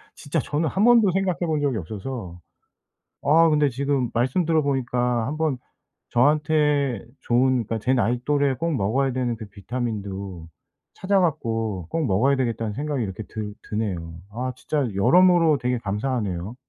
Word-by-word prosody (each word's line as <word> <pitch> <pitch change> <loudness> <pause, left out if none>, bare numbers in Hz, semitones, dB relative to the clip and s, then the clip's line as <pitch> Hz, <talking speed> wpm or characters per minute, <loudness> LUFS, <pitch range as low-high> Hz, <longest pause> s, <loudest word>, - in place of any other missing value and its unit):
진짜 155 +2 -2
저는 150 +3 -1
1 190 +7 0
번도 230 -4 +6
생각해 190 -1 0
본 160 -4 0
적이 140 -5 0
없어서. 100 -1 -6 0.8
아 165 +3 +5
근데 150 -2 +3
지금 135 -1 -1
말씀 130 +9 +1
들어보니까 125 -6 +1
한번 155 -1 -1 0.5
저한테 145 -2 +2 0.2
좋은 125 0 +2
그니까 115 +2 -3
'제 125 +5 +1
나이 120 -1 +1
또래에 145 -2 +2
꼭 165 +2 -1
먹어야 130 +6 +1
되는 125 -2 -1
그 110 -2 -8
비타민도 100 -4 -5 0.5
찾아 195 +1 +1
갖고 115 - -1
꼭 165 -2 -1
먹어야 130 +6 +2
되겠다.'는 115 -4 -2
생각이 145 +1 -2
이렇게 100 +1 -5
들 105 0 -6 0.2
드네요. 90 -7 -3 0.2
아 125 +4 -3
진짜 145 +1 -1
여러모로 170 - +5
되게 125 0 0
감사하네요. 105 -2 -3
130 Hz, 325 characters per minute, -24 LUFS, 110-150 Hz, 0.8 s, 번도